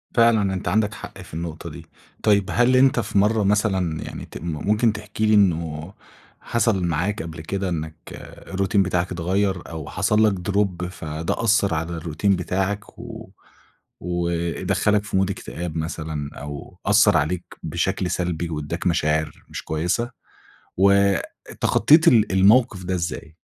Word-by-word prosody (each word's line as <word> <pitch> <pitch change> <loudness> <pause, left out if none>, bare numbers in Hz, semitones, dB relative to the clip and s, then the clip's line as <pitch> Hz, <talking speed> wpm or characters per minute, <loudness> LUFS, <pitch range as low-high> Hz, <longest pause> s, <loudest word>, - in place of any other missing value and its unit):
فعلًا، 110 -5 +4
أنت 95 - -4
عندك 105 0 +1
حق - - -9
في - - -14
النقطة 80 -1 -5
دي. - - -10 0.4
طيب 100 -3 +3
هل 120 +1 +4
أنت 130 -1 +5
في 105 - -2
مرّة 105 +1 +3
مثلًا 95 -6 +1
يعني - - -7
ت - - -10
ممكن 105 +8 +1
تحكي 105 +1 -3
لي 110 - +3
إنه 85 -3 +1 0.5
حصل 115 -5 +1
معاك 85 +3 -1
قبل 80 -1 -7
كده، 95 +4 -3
إنك 80 -2 -4 0.5
الروتين 95 +1 +1
بتاعك 90 -1 -1
اتغير 95 +1 0
أو 80 -3 -7
حصل 105 +3 +2
لك 105 - +4
دروب 95 -1 -1
فده 80 +3 -4
أثر 100 -4 +3
على 80 +1 -2
الروتين 85 +5 0
بتاعك 95 +3 -3
و 115 -3 -9 0.7
ودخّلك 85 +4 0
في 105 -2 -2
مود 95 0 +2
اكتئاب 85 -4 -6
مثلًا، 80 -2 -4
أو 75 +5 -8
أثر 105 0 +5
عليك 85 +4 -1 0.2
بشكل 90 +3 -1
سلبي 85 -2 -2
واداك 80 +3 -3
مشاعر 80 -2 0
مش - - -6
كويسة؟ 90 +10 -1 0.7
واتخطيت 100 - +3
ال 110 -9 +5
الموقف 100 +1 +4
ده 95 +1 -1
إزاي؟ 85 -2 -4
95 Hz, 145 wpm, -23 LUFS, 85-105 Hz, 0.7 s, أنت